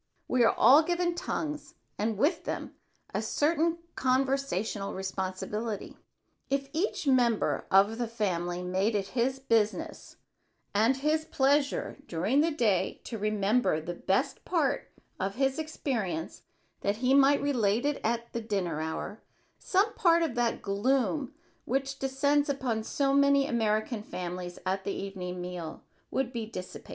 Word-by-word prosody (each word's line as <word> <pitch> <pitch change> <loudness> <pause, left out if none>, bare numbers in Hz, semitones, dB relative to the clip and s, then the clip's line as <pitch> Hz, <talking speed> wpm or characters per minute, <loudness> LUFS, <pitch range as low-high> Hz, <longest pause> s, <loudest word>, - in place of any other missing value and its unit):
We 250 -1 +3
are 225 - +5
all 280 +4 +8
given 345 +1 0
tongues 300 -3 -4 0.2
and 215 0 -1
with 305 - +1
them - - -4 0.4
a - - 0
certain 330 +2 +1 0.2
conversational 260 -6 0
responsibility. 190 +3 -4 0.5
If 275 0 -1
each 335 +1 -1
member 245 -5 +2
of 200 +4 +4
the 240 - 0
family 180 -6 -2
made 190 +5 0
it 195 -1 -1
his 255 +2 0
business 225 -5 -1 0.6
and 225 +6 +3
his 305 +3 +1
pleasure 285 -2 +1
during 195 - +2
the 325 - +3
day 225 - +1
to 225 - -6
remember 210 -2 +1
the 165 +3 -5
best 195 - -1
part 290 -6 0 0.3
of 195 +1 -2
his 270 +2 +1
experience 220 - -3 0.4
that 200 +1 0
he 250 +4 +2
might 280 +1 +6
relate 240 -4 +1
it 290 -1 0
at 235 +1 -1
the 235 - -2
dinner 190 -8 -2
hour 160 +7 -4 0.4
some 405 +4 +2
part 335 -1 +4
of 315 -7 -1
that 240 -1 0
gloom 260 +7 0 0.3
which 270 +2 -1
descends 285 +2 +1
upon 255 -5 -1
so 275 +5 0
many 280 0 +5
American 220 -2 0
families 180 -2 -5
at 190 +1 -1
the 200 - -2
evening 180 -2 -5
meal 180 -2 -6 0.3
would 265 -1 -1
be 230 -2 -3
dissipated. 185 -4 -8
235 Hz, 145 wpm, -29 LUFS, 200-275 Hz, 0.6 s, all